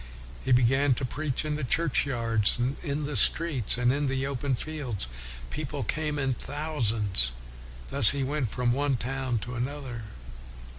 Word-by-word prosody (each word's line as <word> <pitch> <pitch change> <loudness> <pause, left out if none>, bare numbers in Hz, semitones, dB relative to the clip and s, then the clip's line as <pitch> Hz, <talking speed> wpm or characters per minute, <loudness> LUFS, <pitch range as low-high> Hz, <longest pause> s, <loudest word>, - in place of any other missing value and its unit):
He - - -1
began 130 +2 +4
to 130 - -2
preach 145 +2 -2
in 150 -1 -1
the 155 - -4
churchyards, 120 -7 +1
and 125 +3 0
in 145 -1 -2
the 145 0 -3
streets, 150 -10 +4
and 125 +1 +3
in 145 0 0
the 135 0 -1
open 135 0 -1
fields. 135 - -4 0.5
People - - -4
came 155 -1 -1
in 135 -3 0
thou 150 +2 -4
sands. 105 - +1 0.6
Thus 110 - +6
he 140 -1 +3
went 135 -3 -1
from 120 +2 0
one 140 0 +1
town 130 0 -2
to 120 - -6
another. 125 -2 -4
135 Hz, 160 wpm, -28 LUFS, 120-145 Hz, 0.6 s, Thus